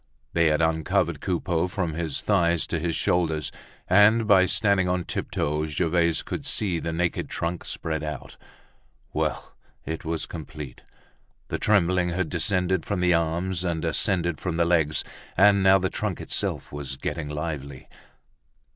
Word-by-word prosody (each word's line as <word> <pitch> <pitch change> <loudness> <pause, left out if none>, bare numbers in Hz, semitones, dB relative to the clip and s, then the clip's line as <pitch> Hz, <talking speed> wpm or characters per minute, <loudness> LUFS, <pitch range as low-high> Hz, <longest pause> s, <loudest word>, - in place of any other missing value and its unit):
They 85 -1 +4
had 75 +1 +2
uncovered 80 -1 +1
Coupeau 90 -1 0
from 90 -3 -2
his 80 -3 -3
thighs 85 -5 +2
to 85 - -2
his 85 0 -1
shoulders, 80 -4 0 0.4
and 105 +4 +5
by 95 -3 +6
standing 95 -2 +2
on 90 0 0
tiptoe 75 -1 -2
Gervaise 85 +1 +1
could 150 - -5
see 105 -10 0
the 80 - -3
naked 85 +1 -1
trunk 85 +1 -3
spread 80 -1 -3
out. 75 -1 -6 0.8
Well! - - -2 0.3
it 80 +1 -4
was 80 -1 -2
complete. 75 -5 -8 0.7
The - - -2
trembling 90 -3 +2
had 85 -1 -1
descended 90 0 +1
from 100 -3 -2
the 90 0 +3
arms 85 +2 0
and 85 -2 -1
ascended 85 -1 +1
from 90 -3 -2
the 85 - +3
legs, 80 -3 +2 0.3
and 100 +1 +6
now 95 0 +6
the 95 0 0
trunk 105 -5 -3
itself - - -2
was 70 -2 -5
getting 75 +1 -4
lively! 75 -3 -5
85 Hz, 150 wpm, -25 LUFS, 80-95 Hz, 0.8 s, by